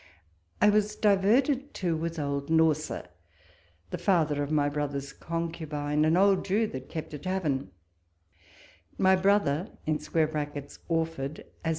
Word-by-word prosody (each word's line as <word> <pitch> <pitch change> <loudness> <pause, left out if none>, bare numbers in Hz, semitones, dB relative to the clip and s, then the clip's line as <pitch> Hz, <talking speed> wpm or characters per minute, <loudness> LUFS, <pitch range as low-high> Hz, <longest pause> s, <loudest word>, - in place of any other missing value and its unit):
I 210 +1 +6
was 210 0 +1
diverted 245 +8 +2
too 175 -4 0
with 165 +1 -3
old 140 -1 -2
Norsa, 160 -1 +2 0.9
the - - -3
father 155 -7 +2
of 145 - -2
my 150 -2 +2
brother's 145 -1 -3
concubine, 155 -3 -2
an 160 +2 +3
old 195 0 +4
Jew 205 +4 +1
that 130 - -7
kept 160 -1 -6
a 150 - -5
tavern; 155 -5 -1 1.3
my 190 0 +5
brother 190 -2 +2 0.2
[Orford], 155 -1 -2 0.2
as 165 - -1
160 Hz, 120 wpm, -28 LUFS, 145-190 Hz, 1.3 s, I